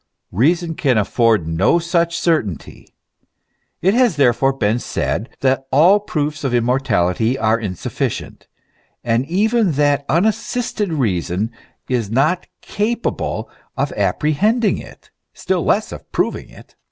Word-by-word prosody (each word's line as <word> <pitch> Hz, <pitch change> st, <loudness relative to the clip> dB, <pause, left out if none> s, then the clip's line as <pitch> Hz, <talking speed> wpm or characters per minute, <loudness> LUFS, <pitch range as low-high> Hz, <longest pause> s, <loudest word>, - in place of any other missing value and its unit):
Reason 165 Hz, -, +1 dB
can 135 Hz, -6 st, +1 dB
afford 110 Hz, -2 st, +2 dB
no 80 Hz, -, +2 dB
such 170 Hz, 0 st, 0 dB
certainty. 155 Hz, -, -2 dB, 1.0 s
It 190 Hz, +3 st, +4 dB
has 240 Hz, -6 st, +3 dB
therefore 135 Hz, -1 st, +3 dB
been 115 Hz, -3 st, 0 dB
said 115 Hz, 0 st, -3 dB
that 135 Hz, 0 st, +1 dB
all 170 Hz, +9 st, +5 dB
proofs 155 Hz, -6 st, -3 dB
of 130 Hz, -3 st, 0 dB
immortality 120 Hz, -2 st, +1 dB
are 110 Hz, -1 st, +1 dB
insufficient, 95 Hz, -6 st, -4 dB, 0.6 s
and 120 Hz, +2 st, 0 dB
even 210 Hz, +2 st, +2 dB
that 145 Hz, 0 st, +2 dB
unassisted 215 Hz, +2 st, 0 dB
reason 105 Hz, -, -1 dB, 0.4 s
is 120 Hz, -5 st, -1 dB
not 150 Hz, -, +1 dB
capable 230 Hz, +3 st, -2 dB, 0.3 s
of -, -, -1 dB
apprehending 210 Hz, -, +1 dB
it, -, -, -14 dB, 0.2 s
still -, -, -1 dB
less -, -, +1 dB
of -, -, -10 dB
proving -, -, -2 dB
it. -, -, -17 dB
140 Hz, 120 wpm, -19 LUFS, 115-175 Hz, 1.0 s, all